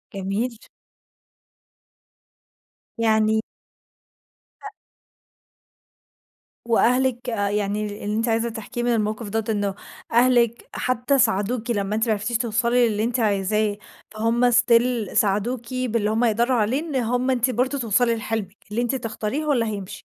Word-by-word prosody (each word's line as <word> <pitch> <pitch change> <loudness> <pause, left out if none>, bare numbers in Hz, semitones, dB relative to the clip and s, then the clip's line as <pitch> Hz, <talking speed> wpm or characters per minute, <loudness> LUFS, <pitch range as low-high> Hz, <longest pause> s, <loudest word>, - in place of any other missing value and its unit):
جميل. 205 +5 -2 2.4
يعني 220 -1 +2 1.2
آآ 415 - -7 1.9
وأهلِك 245 +1 +2
آآ 205 -3 -1
يعني 205 0 -2
اللي 210 - -1
أنتِ 230 - 0
عايزه 230 +1 +1
تحكيه 230 +2 -5
من 240 0 +2
الموقف 215 0 -2
دوّة 225 +1 -1
إنه 205 -2 -1 0.4
أهلِك 235 -1 +3
حتى 255 +2 0
ساعدوكِ 230 +3 +1
لمّا 205 -2 -1
أنتِ 220 +2 +1
ما 225 - +2
عرفتيش 220 +3 -1
توصلي 240 +1 +2
للي 215 0 -1
أنتِ 240 +2 0
عايزاه 210 0 +1 0.3
فهُم 230 +3 +2
Still 235 -2 +3
ساعدوكِ 230 +5 0
باللي 230 -4 0
هُم 225 +3 +1
يقدروا 235 +3 +2
عليه، 230 +6 +1
إن 315 -3 -5
هُم 250 +1 0
أنتِ 250 0 +1
برضه 255 +4 0
توصَلِي 235 +1 +2
لحلمِك، 220 -3 -4
اللي 230 +3 0
أنتِ 245 +2 -1
تختاريه 230 +3 -3
هو 300 -1 +1
اللي 235 -3 +1
هيمشي. 200 -4 -6
230 Hz, 130 wpm, -23 LUFS, 210-245 Hz, 2.4 s, أهلِك